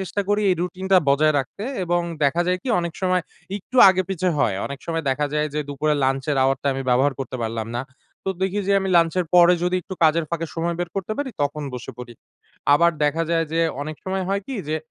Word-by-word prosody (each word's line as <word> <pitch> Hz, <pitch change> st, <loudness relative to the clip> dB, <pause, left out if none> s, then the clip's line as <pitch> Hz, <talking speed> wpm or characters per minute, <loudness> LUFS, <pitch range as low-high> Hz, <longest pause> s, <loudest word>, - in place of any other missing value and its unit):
চেষ্টা 190 Hz, +2 st, -2 dB
করি 205 Hz, +1 st, +2 dB
এই -, -, +4 dB
রুটিন 180 Hz, +1 st, -4 dB
টা 190 Hz, -, +8 dB
বজায় 155 Hz, +3 st, +4 dB
রাখতে 140 Hz, +10 st, -5 dB, 0.2 s
এবং 175 Hz, 0 st, +1 dB, 0.2 s
দেখা 165 Hz, +5 st, +2 dB
যায় 180 Hz, 0 st, +2 dB
কি 265 Hz, -, -5 dB
অনেক 170 Hz, -1 st, -3 dB
সময় 185 Hz, -1 st, +2 dB, 0.3 s
একটু 230 Hz, +6 st, -8 dB
আগে-পিছে 185 Hz, -1 st, 0 dB
হয়। 105 Hz, -7 st, +2 dB
অনেক 140 Hz, -1 st, -6 dB
সময় 165 Hz, -1 st, -2 dB
দেখা 145 Hz, +3 st, 0 dB
যায় 150 Hz, 0 st, +1 dB
যে, -, -, -1 dB
দুপুরে 150 Hz, +2 st, 0 dB
লাঞ্চের 135 Hz, +2 st, 0 dB
আওয়ার 135 Hz, 0 st, +2 dB
টা -, -, -3 dB
আমি 135 Hz, 0 st, -3 dB
ব্যবহার 135 Hz, +3 st, +3 dB
করতে 130 Hz, -1 st, -4 dB
পারলাম 110 Hz, -1 st, -3 dB
না। 120 Hz, -, -2 dB, 0.4 s
তো -, -, -2 dB
দেখি 190 Hz, +2 st, 0 dB
যে -, -, +4 dB
আমি 195 Hz, -, -2 dB
লাঞ্চের 170 Hz, +2 st, +3 dB
পরে 175 Hz, 0 st, +7 dB
যদি 180 Hz, +1 st, +1 dB
একটু 190 Hz, -, -7 dB
কাজের 160 Hz, +1 st, +3 dB
ফাঁকে 165 Hz, -1 st, -2 dB
সময় 170 Hz, +1 st, -1 dB
বের 175 Hz, -, -2 dB
করতে 195 Hz, +2 st, -2 dB
পারি, 285 Hz, -2 st, -2 dB
তখন 145 Hz, +1 st, -2 dB
বসে 125 Hz, +2 st, -6 dB
পড়ি। 125 Hz, -1 st, -8 dB, 0.6 s
আবার 170 Hz, +3 st, +4 dB
দেখা 150 Hz, +3 st, +1 dB
যায় 165 Hz, -1 st, +2 dB
যে, 165 Hz, -, +1 dB, 0.2 s
অনেক 155 Hz, +1 st, -6 dB
সময় 190 Hz, 0 st, -2 dB
হয় 200 Hz, +1 st, 0 dB
কি 270 Hz, -, -5 dB
যে 155 Hz, -, 0 dB
165 Hz, 225 wpm, -22 LUFS, 145-185 Hz, 0.6 s, টা